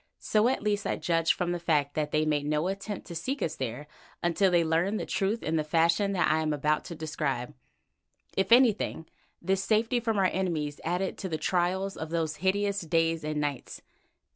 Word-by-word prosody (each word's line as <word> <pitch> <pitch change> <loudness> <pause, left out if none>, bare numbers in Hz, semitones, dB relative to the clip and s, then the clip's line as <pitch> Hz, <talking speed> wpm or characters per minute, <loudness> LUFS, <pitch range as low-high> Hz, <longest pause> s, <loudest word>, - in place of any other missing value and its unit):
So 215 +1 +2
at 255 -4 0
least 205 -1 0
I - - 0
judged 165 -2 +1
from 180 -1 -2
the 175 - -2
fact 150 -4 +1
that 150 -1 -1
they 155 +1 +1
made 150 -1 0
no 150 +3 +1
attempt 200 +1 -5
to 170 - -8
seek 260 - -3
us 160 - -2
there 130 +2 -4 0.4
until 175 +3 +3
they 175 -2 +3
learned 170 +6 +1
the - - -3
truth 205 +3 -1
in 160 +1 0
the 155 - +1
fashion 170 +6 +2
that 180 - +2
I 155 - +2
am 155 -1 0
about 150 +1 0
to 170 - -7
describe. 150 -5 -3 0.8
If 195 +3 0
anything, 230 -9 +4 0.4
this 190 +2 +1
safety 225 +4 +2
from 225 -2 -1
our 195 - +3
enemies 165 -6 -1
added 180 +3 -2
to 190 - -4
the 160 - -1
trials 185 +3 0
of 160 - -5
those 160 -2 -1
hideous 200 +3 0
days 165 -1 +1
and 155 0 -2
nights. 145 -3 -4
170 Hz, 200 wpm, -28 LUFS, 155-195 Hz, 0.8 s, anything